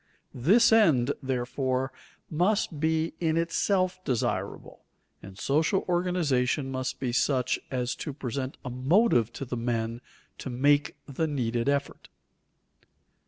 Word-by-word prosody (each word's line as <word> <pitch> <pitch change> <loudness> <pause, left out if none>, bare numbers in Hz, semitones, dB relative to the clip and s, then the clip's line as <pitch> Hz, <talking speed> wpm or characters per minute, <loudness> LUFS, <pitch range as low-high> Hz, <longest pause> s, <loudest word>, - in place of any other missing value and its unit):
This 200 - +4
end, 150 - +4
therefore, 130 0 -1 0.3
must 175 -1 0
be 160 +1 0
in 160 -1 +1
itself 185 +2 0
desirable, 130 -8 -3 0.4
and 95 0 -12
social 155 - +1
organization 155 -7 0
must 130 -1 -3
be 130 -2 -1
such 130 0 +1
as 125 -1 -1
to 150 - -4
present 135 -1 -4
a 125 - -4
motive 130 - +3
to 135 - -5
the 125 0 -4
men 115 0 -2 0.4
to - - -5
make 145 +3 +2
the 150 +3 -2
needed 120 -3 -1
effort. 140 0 -2
135 Hz, 120 wpm, -27 LUFS, 125-165 Hz, 0.4 s, This